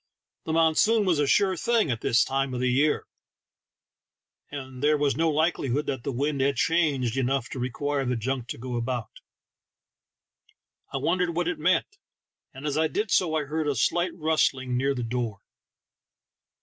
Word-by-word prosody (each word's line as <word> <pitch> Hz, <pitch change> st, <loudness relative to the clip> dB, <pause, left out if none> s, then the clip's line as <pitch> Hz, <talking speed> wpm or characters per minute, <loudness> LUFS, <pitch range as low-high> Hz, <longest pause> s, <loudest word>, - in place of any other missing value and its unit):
The 160 Hz, -, -2 dB
monsoon 165 Hz, +7 st, +3 dB
was 175 Hz, -5 st, +2 dB
a 145 Hz, -, +2 dB
sure 190 Hz, +5 st, +3 dB
thing 225 Hz, -, +1 dB
at 115 Hz, -, -3 dB
that -, -, -1 dB
season 135 Hz, +2 st, +2 dB
of -, -, -3 dB
the 125 Hz, 0 st, +1 dB
year, 145 Hz, +4 st, +2 dB, 1.4 s
and 130 Hz, -3 st, -8 dB
there 150 Hz, +1 st, +3 dB
was 145 Hz, -3 st, +1 dB
no 165 Hz, +3 st, +2 dB
likelihood 150 Hz, -3 st, 0 dB
that 130 Hz, -3 st, -3 dB
the 140 Hz, -, -2 dB
wind 140 Hz, +2 st, -1 dB
had 140 Hz, +1 st, +2 dB
changed 140 Hz, -7 st, +1 dB
enough 135 Hz, -1 st, 0 dB
to 130 Hz, -, -6 dB
require 140 Hz, +3 st, -2 dB
the 125 Hz, -1 st, -1 dB
junk 125 Hz, +1 st, -3 dB
to -, -, -5 dB
go 125 Hz, 0 st, -4 dB
about. 120 Hz, -2 st, -3 dB, 1.8 s
I -, -, -2 dB
won 180 Hz, +2 st, 0 dB
dered 175 Hz, -2 st, 0 dB
what 175 Hz, 0 st, 0 dB
it 180 Hz, -, -2 dB
meant, 185 Hz, -, +1 dB, 0.5 s
and 135 Hz, +3 st, -10 dB
as 150 Hz, 0 st, 0 dB
I 160 Hz, -, +3 dB
did 210 Hz, +5 st, -2 dB
so 165 Hz, -4 st, +2 dB
I 155 Hz, -, +1 dB
heard 155 Hz, +2 st, -2 dB
a 145 Hz, -, 0 dB
slight 175 Hz, +8 st, +1 dB
rustling 140 Hz, -6 st, +1 dB
near 135 Hz, +2 st, +1 dB
the 125 Hz, -, -3 dB
door. 115 Hz, -4 st, -3 dB
140 Hz, 175 wpm, -26 LUFS, 130-160 Hz, 1.8 s, monsoon